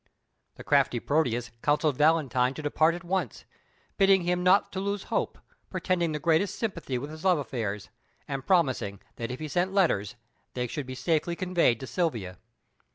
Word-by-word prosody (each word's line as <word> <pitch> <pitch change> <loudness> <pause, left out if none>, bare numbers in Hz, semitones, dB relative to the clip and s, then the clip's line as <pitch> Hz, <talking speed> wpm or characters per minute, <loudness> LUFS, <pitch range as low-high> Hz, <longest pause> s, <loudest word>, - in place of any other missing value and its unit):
The - - -10
crafty 120 - +2
Proteus 125 -4 0
counselled 150 0 +2
Valentine 135 -4 +2
to 155 - -7
depart 155 +3 +2
at 175 - -8
once, 175 - -2 0.5
bidding 195 -2 +5
him 180 +1 0
not 185 +2 +4
to 190 - -4
lose 200 0 -2
hope, - - -1 0.3
pretending 175 -3 0
the 150 - -2
greatest 165 +5 +1
sympathy 170 - -3
with 140 +4 -6
his 155 +2 -10
love 185 -3 +4
affairs, 110 -8 -4 0.4
and 135 -1 -4
promising 130 - +1 0.2
that 115 - -4
if 125 - -5
he 155 - -4
sent 180 +5 0
letters 105 - +2 0.4
they 125 -1 -1
should 130 +2 -5
be 130 - -6
safely 165 +4 0
conveyed 175 -10 +2
to - - -4
Silvia. 120 - -2
155 Hz, 170 wpm, -28 LUFS, 125-180 Hz, 0.5 s, bidding